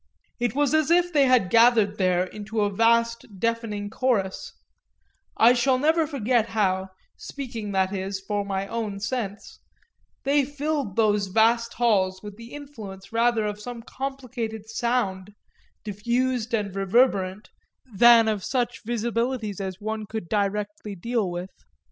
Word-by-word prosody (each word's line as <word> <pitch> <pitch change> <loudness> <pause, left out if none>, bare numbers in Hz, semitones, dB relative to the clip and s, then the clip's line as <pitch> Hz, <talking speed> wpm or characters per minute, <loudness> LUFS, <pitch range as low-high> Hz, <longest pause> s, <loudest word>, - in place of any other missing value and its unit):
It 240 -1 -1
was 290 -1 +2
as 310 -1 +2
if 350 +1 +3
they 285 -2 +5
had 250 -8 +3
gathered 230 -3 +4
there 180 -1 +2
into 215 +3 -4
a 205 0 +1
vast 230 +2 +2
deafening 220 -2 -2
chorus; 220 -7 -1 0.9
I 235 +2 +7
shall 255 +1 +2
never 315 +3 +2
forget 245 -5 +1
how 190 -3 0 0.3
speaking, 235 -7 -6
that 190 0 +1
is, 190 0 -3
for 205 +1 -2
my 195 -1 -2
own 215 -3 -4
sense 215 -2 -4 0.6
they 280 +1 +3
filled 290 -6 -3
those 210 -3 +2
vast 230 +3 +2
halls 195 -6 +2
with 205 -1 -8
the 230 +2 -12
influence 220 -10 -10
rather 230 -1 +2
of 210 0 -3
some 235 0 -7
complicated 245 -5 -5
sound, 210 -5 -1 0.5
diffused 235 +3 -1
and 205 -4 -1
reverberant, 195 -1 +1 0.4
than 230 +1 +7
of 210 -3 -1
such 245 -2 -2
visibilities 230 -2 -2
as 190 -1 -5
one 215 0 -4
could 220 -5 -5
directly 210 +1 -2
deal 225 +1 -1
with. 175 +2 -5
220 Hz, 140 wpm, -25 LUFS, 200-245 Hz, 0.9 s, I